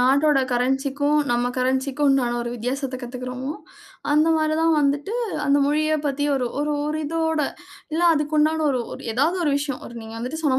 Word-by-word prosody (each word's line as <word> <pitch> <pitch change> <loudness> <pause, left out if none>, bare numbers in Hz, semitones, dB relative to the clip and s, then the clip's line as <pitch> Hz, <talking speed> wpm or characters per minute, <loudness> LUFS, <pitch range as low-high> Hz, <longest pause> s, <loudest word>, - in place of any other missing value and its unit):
நாட்டோட 280 +3 +4
கரன்சிக்கும் 270 +4 +1
நம்ம 240 0 +1
கரன்சிக்கும் 265 +3 +1
உண்டான 245 -3 +2
ஒரு 235 - -4
வித்தியாசத்த 255 +3 -3
கத்துக்குறமோ. 250 +3 -5 0.6
அந்த 305 +2 +4
மாரி 310 0 +1
தான் 325 0 +3
வந்துட்டு, 290 +9 0 0.3
அந்த 285 0 +3
மொழிய 310 +1 +1
பத்தி 285 +1 -1
ஒரு 255 -2 0 0.4
ஒரிதோட 315 +1 -1 0.5
இல்ல 335 +2 0
அதுக்குண்டான 310 +1 +1
ஒரு 255 - 0
ஒரு - - -8
எதாவது 310 +10 +1
ஒரு 295 - +2
விஷயம். 280 -2 -3
ஒரு 240 - -11
நீங்க 220 0 -9
வந்துட்டு 255 +7 -4
சொன்ன 265 -4 +2
280 Hz, 160 wpm, -23 LUFS, 255-305 Hz, 0.6 s, நாட்டோட